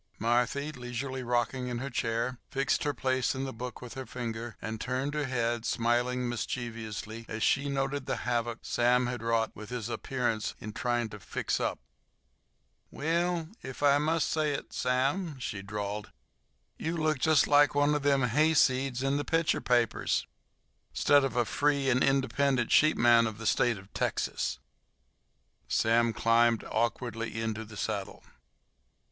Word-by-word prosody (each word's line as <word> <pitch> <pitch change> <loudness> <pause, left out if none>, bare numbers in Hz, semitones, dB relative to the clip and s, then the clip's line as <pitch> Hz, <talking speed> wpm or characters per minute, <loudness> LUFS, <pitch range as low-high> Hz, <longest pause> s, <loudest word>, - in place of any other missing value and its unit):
Marthy, 125 +6 +1
leisurely 125 0 -5
rocking 125 +1 -1
in 120 -1 -3
her 135 +3 -4
chair, 120 +1 -1
fixed 135 +1 0
her 145 - +2
place 130 -1 0
in 130 - -3
the 135 - -4
book 125 +1 -7
with 125 - -8
her 130 -2 -7
finger, 115 -1 -5
and 110 0 -5
turned 130 +3 -2
her 150 -1 -1
head, 120 -2 -1
smiling 120 +1 +1
mischievously 115 -2 -4
as 110 0 -3
she 140 +1 +2
noted 135 0 -2
the - - 0
havoc 120 -1 -1
Sam 125 +1 +2
had 120 -2 -3
wrought 115 -1 +1
with 105 -1 -9
his 120 -2 -4
appearance 120 -3 -2
in 110 0 -7
trying 120 0 0
to 105 - -9
"fix - - -2
up." - - -1 1.1
"Well, 170 +1 -1
ef 130 +2 -7
I 145 0 +5
must 160 +1 +1
say 155 -2 0
it, - - -6
Sam," 135 +6 0
she 110 -5 -4
drawled, 105 +1 -5 0.7
"you 165 +2 -2
look 155 -3 +1
jest 155 +1 +4
like 145 0 +5
one 145 +1 +3
of 150 - 0
them 140 -2 +3
hayseeds 130 -1 +3
in 135 +1 +1
the 145 - -1
picture 165 +1 +1
papers, 120 -3 +1 0.7
'stead 145 -1 +4
of 135 -3 -1
a 120 -1 +2
free 140 +1 +1
and 130 +1 +3
independent 135 -2 +1
sheepman 120 -6 +5
of 110 -1 -6
the 110 - -8
State 120 +2 +2
o' 95 - -11
Texas." - - -1 1.1
Sam 115 - +3
climbed 115 0 +3
awkwardly 115 0 -2
into 110 0 -2
the 105 -1 -11
saddle. - - -4
125 Hz, 155 wpm, -30 LUFS, 115-140 Hz, 1.1 s, I